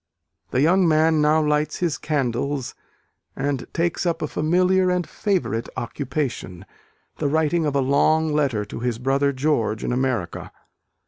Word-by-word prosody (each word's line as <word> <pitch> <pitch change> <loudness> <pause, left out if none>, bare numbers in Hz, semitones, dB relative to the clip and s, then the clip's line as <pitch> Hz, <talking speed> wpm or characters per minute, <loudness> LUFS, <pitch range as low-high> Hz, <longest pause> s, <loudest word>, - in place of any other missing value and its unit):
The 130 - +1
young 180 +3 +4
man 160 0 +3
now 155 +1 +3
lights 150 0 0
his 170 -4 -1
candles, 140 -2 -2 0.6
and 135 -1 -3
takes 170 0 -1
up 170 -3 -1
a - - -1
familiar 180 +5 +2
and 180 -1 0
favourite 170 - -1
occupation; 125 - -4 0.5
the 150 - 0
writing 160 +2 +1
of 145 - -2
a 140 - +3
long 155 +4 +2
letter 135 -8 0
to 105 - -7
his 120 -1 -2
brother 135 +3 +1
George 130 -6 0
in - - -1
America. 125 -9 -2
150 Hz, 145 wpm, -23 LUFS, 130-160 Hz, 0.6 s, young